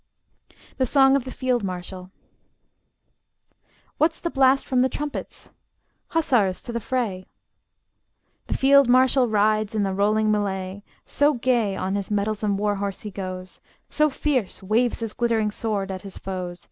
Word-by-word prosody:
THE 260 Hz, -, +1 dB
SONG 270 Hz, +1 st, +5 dB
OF 275 Hz, -3 st, 0 dB
THE 260 Hz, -, -6 dB
FIELD 250 Hz, -4 st, -1 dB
MARSHAL 185 Hz, 0 st, -6 dB, 1.9 s
What's 320 Hz, +2 st, +2 dB
the 340 Hz, -, -3 dB
blast 270 Hz, 0 st, +3 dB
from 255 Hz, -, 0 dB
the 260 Hz, +1 st, +3 dB
trumpets? 295 Hz, +1 st, -6 dB, 0.6 s
Hussars, 245 Hz, -, +1 dB
to -, -, -6 dB
the 235 Hz, -, -1 dB
fray! 220 Hz, -7 st, -3 dB, 1.2 s
The -, -, -2 dB
field 275 Hz, -1 st, +5 dB
marshal 255 Hz, 0 st, +4 dB
rides 215 Hz, 0 st, +1 dB
in 210 Hz, -, +1 dB
the 195 Hz, -1 st, -1 dB
rolling 215 Hz, +2 st, +2 dB
mellay: 195 Hz, -2 st, -2 dB, 0.2 s
So 290 Hz, 0 st, +2 dB
gay 235 Hz, -5 st, +1 dB
on, 190 Hz, 0 st, -2 dB
his 200 Hz, -1 st, -3 dB
mettlesome 210 Hz, 0 st, -1 dB
war 205 Hz, 0 st, 0 dB
horse 200 Hz, -1 st, -4 dB
he 210 Hz, -, -7 dB
goes, 185 Hz, -1 st, -7 dB, 0.3 s
So 305 Hz, 0 st, +3 dB
fierce 265 Hz, -9 st, -2 dB
waves 230 Hz, +5 st, +1 dB
his 225 Hz, -2 st, -3 dB
glittering 225 Hz, -3 st, 0 dB
sword 205 Hz, -3 st, -2 dB
at 185 Hz, -1 st, -5 dB
his 195 Hz, -2 st, -9 dB
foes. 180 Hz, -2 st, -5 dB
215 Hz, 150 wpm, -24 LUFS, 195-255 Hz, 1.9 s, SONG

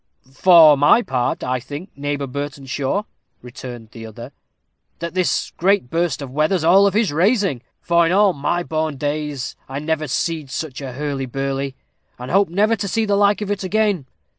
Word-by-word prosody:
"For 160 Hz, 0 st, +7 dB
my 145 Hz, -, +5 dB
part, 125 Hz, -9 st, -1 dB
I 130 Hz, 0 st, -1 dB
think, 145 Hz, -, -8 dB
Neighbor 145 Hz, 0 st, -3 dB
Burtenshaw," 140 Hz, +5 st, -3 dB, 0.4 s
returned 120 Hz, -2 st, -9 dB
the 115 Hz, 0 st, -9 dB
other, 120 Hz, +4 st, -10 dB, 0.7 s
"that 170 Hz, 0 st, -5 dB
this 185 Hz, -1 st, 0 dB
great 190 Hz, -7 st, +1 dB
burst 165 Hz, -5 st, -1 dB
of 130 Hz, -, -8 dB
weather's 155 Hz, +5 st, +1 dB
all 190 Hz, +5 st, +6 dB
of 200 Hz, -, -1 dB
his 215 Hz, -5 st, +2 dB
raising, 185 Hz, -, +1 dB, 0.2 s
for 170 Hz, -1 st, +3 dB
in -, -, 0 dB
all 200 Hz, 0 st, +4 dB
my 175 Hz, +4 st, -1 dB
born 155 Hz, -3 st, -2 dB
days 145 Hz, -1 st, -3 dB
I 135 Hz, -, -5 dB
never 155 Hz, +1 st, -2 dB
see'd 155 Hz, +1 st, -2 dB
such 145 Hz, 0 st, -5 dB
a 130 Hz, -2 st, -6 dB
hurly 140 Hz, -1 st, -3 dB
burly, 135 Hz, +1 st, -3 dB, 0.4 s
and 125 Hz, +1 st, -7 dB
hope 195 Hz, 0 st, +3 dB
never 210 Hz, +6 st, +2 dB
to 200 Hz, -, -3 dB
see 225 Hz, +3 st, 0 dB
the 205 Hz, -1 st, +1 dB
like 205 Hz, +1 st, +3 dB
of 205 Hz, -1 st, -3 dB
it 200 Hz, -1 st, -2 dB
again. 200 Hz, -6 st, 0 dB
155 Hz, 180 wpm, -20 LUFS, 135-185 Hz, 0.7 s, For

